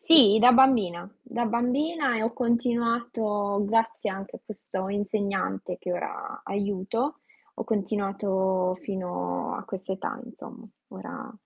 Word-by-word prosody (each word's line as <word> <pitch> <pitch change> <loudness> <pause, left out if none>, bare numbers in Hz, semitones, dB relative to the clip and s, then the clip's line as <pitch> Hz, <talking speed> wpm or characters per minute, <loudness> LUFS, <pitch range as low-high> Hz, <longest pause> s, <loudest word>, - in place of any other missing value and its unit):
Sì, 245 -11 +8
da 245 +3 +8
bambina. 230 -10 +4
Da 240 -1 -3
bambina 255 +4 +1
e 220 - -1
ho 230 +1 0
continuato, 235 -4 0
grazie 225 0 +1
anche 195 +1 -7
a - - -17
questo 190 -2 -5
insegnante 200 - -2
che 180 - -3
ora 415 - -5
aiuto, 205 +7 -1 0.4
ho 230 - -4
continuato 195 -3 0
fino 90 - -3
a - - -6
quest'età 190 +2 -4
insomma. 235 0 -11 0.2
Ora 265 +7 -8
215 Hz, 120 wpm, -27 LUFS, 190-240 Hz, 0.4 s, Sì